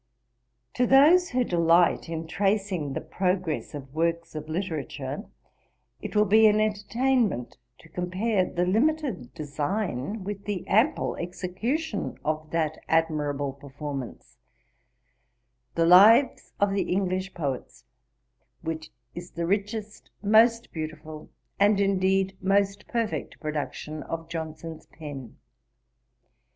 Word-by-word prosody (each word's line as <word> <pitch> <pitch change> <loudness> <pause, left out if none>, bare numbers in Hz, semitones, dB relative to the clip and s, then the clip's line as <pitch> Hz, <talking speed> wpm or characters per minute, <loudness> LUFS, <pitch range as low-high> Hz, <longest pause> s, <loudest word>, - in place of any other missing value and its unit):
To 250 - +1
those 315 +7 +6
who 250 0 +1
delight 170 -3 +3
in 165 0 -4
tracing 195 -4 -1
the - - -3
progress 180 -1 -2
of 135 -2 -9
works 170 +1 -1
of 155 0 -6
literature, 155 - -4 0.8
it - - -6
will 210 0 +5
be 220 +2 +6
an 210 0 +4
entertainment 215 - 0 0.2
to - - -17
compare 185 +5 0
the 175 0 -1
limited 235 - 0
design 155 - -3
with 200 0 -6
the 205 -4 -3
ample 235 +10 +2
execution 200 - -3
of 155 0 -2
that 155 -1 -1
admirable 150 -4 0
performance, 140 -2 -8 1.4
The 165 - +3
Lives 210 +10 +6
of 200 0 +3
the 200 - -1
English 185 0 -1
Poets, 140 -6 -4 0.8
which 160 -1 -4 0.2
is 175 +1 -8
the 170 0 -3
richest, 205 +3 -3
most 230 +3 +4
beautiful 155 -1 -7 0.3
and 200 0 +4
indeed 195 -1 +2
most 195 +1 +1
perfect 230 -3 -3
production 155 0 -4
of 165 0 -6
Johnson's 160 -1 -6
pen. 140 -7 -9
180 Hz, 115 wpm, -26 LUFS, 155-210 Hz, 1.4 s, those